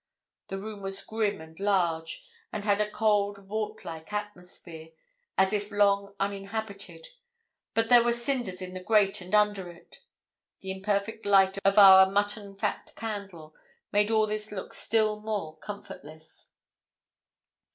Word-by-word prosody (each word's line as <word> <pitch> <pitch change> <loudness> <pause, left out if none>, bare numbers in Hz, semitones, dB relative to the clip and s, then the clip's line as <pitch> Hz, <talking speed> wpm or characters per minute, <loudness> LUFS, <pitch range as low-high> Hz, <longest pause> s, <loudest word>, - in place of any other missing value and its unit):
The 195 - -4
room 210 +1 -7
was 195 0 -4
grim 215 -5 -1
and 160 +1 -14
large, 180 - 0 0.3
and 210 -1 -5
had 205 0 +3
a 210 - 0
cold, 205 -2 +1
vault 215 +1 -4
like 160 +2 -8
atmosphere, 180 -5 -7 0.4
as 190 +1 +3
if 205 0 -1
long 200 -1 +2
uninhabited; 200 - -5 0.7
but 225 0 +1
there 245 -1 +8
were 240 - +2
cinders 235 -6 -2
in 185 0 -7
the 185 - -5
grate 205 0 +2
and 185 +4 -1
under 205 -3 +2
it. 170 0 -15 0.6
The 190 - -5
imperfect 200 +3 -2
light 195 -1 +4
of 195 +1 +3
our 190 -2 +9
mutton 205 0 -1
fat 195 - -3
candle 200 -8 -6 0.4
made 205 +1 +3
all 220 -1 +3
this 215 0 -5
look 190 -3 -6
still 215 -1 +1
more 205 -8 -4
comfortless. 160 -6 -11
200 Hz, 140 wpm, -28 LUFS, 190-210 Hz, 0.7 s, our